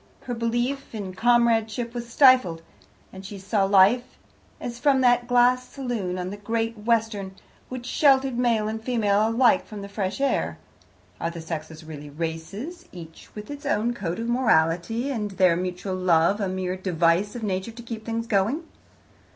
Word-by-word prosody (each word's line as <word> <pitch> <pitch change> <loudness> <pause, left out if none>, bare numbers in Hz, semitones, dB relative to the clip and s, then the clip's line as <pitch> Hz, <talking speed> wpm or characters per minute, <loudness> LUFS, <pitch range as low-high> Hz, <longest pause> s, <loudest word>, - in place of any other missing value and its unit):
Her 245 - -5
belief 240 +3 -2
in 195 -3 -5
comradeship 230 +1 +2
was 240 -1 -6
stifled, 245 - +5 0.5
and 190 0 -9
she 200 +1 -8
saw 195 +1 0
life 200 +6 +4 0.4
as 240 -1 -6
from 275 -1 +3
that 245 -1 +3
glass 250 +1 +3
saloon 235 -9 -3
on 180 0 -4
the 205 - -6
Great 225 +2 -2
Western, 215 -3 -1 0.3
which 255 -1 -6
sheltered 270 -1 +3
male 235 -3 +1
and 220 +1 -4
female 215 -3 +2
alike 235 +1 +4
from 210 -2 -8
the - - -6
fresh 200 0 -3
air. 275 0 0 0.6
Are 165 - -1
the 170 0 -8
sexes 160 -1 -6
really 150 -2 -9
races, 165 - -6
each 165 -2 -12
with 210 +4 -8
its 285 +1 -8
own 240 -4 0
code 180 -6 -4
of 230 - -3
morality, 225 - +1
and 215 -5 -2
their 185 -3 +3
mutual 180 +2 -3
love 185 +2 +2
a 195 - 0
mere 185 -1 -2
device 180 +2 +1
of 235 - -6
Nature 190 0 -2
to 235 +1 -10
keep 225 -2 -7
things 230 0 -3
going? 225 - +1
215 Hz, 165 wpm, -25 LUFS, 185-240 Hz, 0.6 s, stifled